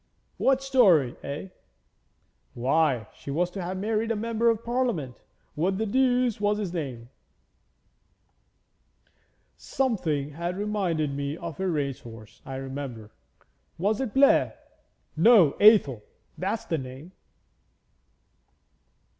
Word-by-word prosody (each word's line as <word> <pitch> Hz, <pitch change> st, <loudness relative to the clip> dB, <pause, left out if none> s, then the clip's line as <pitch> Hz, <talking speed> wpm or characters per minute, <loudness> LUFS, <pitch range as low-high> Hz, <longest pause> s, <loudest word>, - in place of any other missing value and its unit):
'What 270 Hz, 0 st, +2 dB
story, 190 Hz, -, +4 dB
eh?' 145 Hz, +7 st, -6 dB, 1.1 s
'Why, 130 Hz, -2 st, +1 dB
she -, -, -11 dB
was 175 Hz, +5 st, 0 dB
to 195 Hz, -, -6 dB
have 180 Hz, +2 st, -4 dB
married 215 Hz, +3 st, -1 dB
a 225 Hz, -, 0 dB
Member 230 Hz, +2 st, +1 dB
of 230 Hz, 0 st, 0 dB
Parliament; 235 Hz, -, -2 dB, 0.3 s
what 185 Hz, +5 st, 0 dB
the 220 Hz, -, -1 dB
deuce 250 Hz, -1 st, +1 dB
was 205 Hz, 0 st, +1 dB
his 200 Hz, -5 st, -4 dB
name? 130 Hz, -8 st, -5 dB, 2.5 s
Something 165 Hz, -, -1 dB
that 170 Hz, +4 st, -4 dB
reminded 190 Hz, -8 st, -1 dB
me 140 Hz, +2 st, -3 dB
of 170 Hz, -2 st, -7 dB
a 190 Hz, -, -1 dB
race 145 Hz, -6 st, -2 dB
horse, 115 Hz, -2 st, -13 dB
I 135 Hz, -, -5 dB
remember. 130 Hz, -5 st, -7 dB, 0.7 s
Was 205 Hz, +7 st, 0 dB
it 255 Hz, -4 st, -4 dB
Blair? 275 Hz, 0 st, +4 dB, 0.6 s
No 175 Hz, -, +6 dB
Athel! 200 Hz, -, +5 dB, 0.3 s
That's 200 Hz, +5 st, -3 dB
the 165 Hz, -, -1 dB
name.' 130 Hz, +6 st, -9 dB
175 Hz, 115 wpm, -26 LUFS, 140-220 Hz, 2.5 s, No